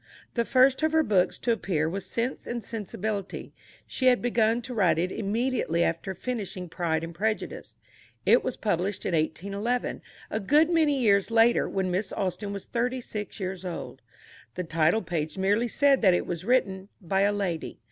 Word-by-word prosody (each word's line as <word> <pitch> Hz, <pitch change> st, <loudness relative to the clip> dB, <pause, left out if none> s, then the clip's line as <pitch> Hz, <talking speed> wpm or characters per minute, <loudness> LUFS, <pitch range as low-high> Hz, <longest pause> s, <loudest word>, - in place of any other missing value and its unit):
The 235 Hz, -1 st, 0 dB
first 260 Hz, +2 st, +4 dB
of 315 Hz, 0 st, +1 dB
her 320 Hz, 0 st, +4 dB
books 195 Hz, -8 st, +2 dB
to 240 Hz, -, 0 dB
appear 180 Hz, -8 st, 0 dB
was 195 Hz, +4 st, -4 dB
Sense 240 Hz, +3 st, -3 dB
and 240 Hz, -1 st, -4 dB
Sensibility. 205 Hz, -2 st, -4 dB, 0.3 s
She 255 Hz, -, -1 dB
had 250 Hz, -1 st, +5 dB
begun 230 Hz, -1 st, +1 dB
to 255 Hz, -, -6 dB
write 190 Hz, -8 st, +3 dB
it 180 Hz, +3 st, 0 dB
immediately 220 Hz, -5 st, 0 dB
after 170 Hz, +3 st, -2 dB
finishing 195 Hz, -5 st, -4 dB
Pride 165 Hz, -2 st, -1 dB
and 165 Hz, +1 st, -6 dB
Prejudice. 215 Hz, +5 st, -3 dB, 0.5 s
It -, -, +5 dB
was -, -, -3 dB
published 195 Hz, -1 st, -1 dB
in -, -, -1 dB
1811, 200 Hz, +9 st, -1 dB, 0.3 s
a 220 Hz, -, -1 dB
good 300 Hz, -, +3 dB
many 310 Hz, -4 st, +3 dB
years 200 Hz, -5 st, +3 dB
later, 230 Hz, +1 st, +4 dB
when 190 Hz, -2 st, -1 dB
Miss 190 Hz, +4 st, -1 dB
Austen 195 Hz, +2 st, -3 dB
was 200 Hz, -1 st, -6 dB
thirty 250 Hz, +2 st, -1 dB
six 210 Hz, -3 st, -6 dB
years 190 Hz, -1 st, -4 dB
old. 180 Hz, -2 st, -6 dB, 0.5 s
The 180 Hz, -, -2 dB
title 165 Hz, +5 st, +2 dB
page 160 Hz, -2 st, -3 dB
merely 205 Hz, +5 st, +2 dB
said 275 Hz, +3 st, +3 dB
that 185 Hz, -4 st, +5 dB
it -, -, -1 dB
was 175 Hz, -1 st, -4 dB
written 200 Hz, -6 st, +1 dB
"By 190 Hz, +1 st, 0 dB
a 200 Hz, +1 st, +4 dB
Lady." 195 Hz, -5 st, -3 dB
200 Hz, 180 wpm, -27 LUFS, 180-235 Hz, 0.5 s, had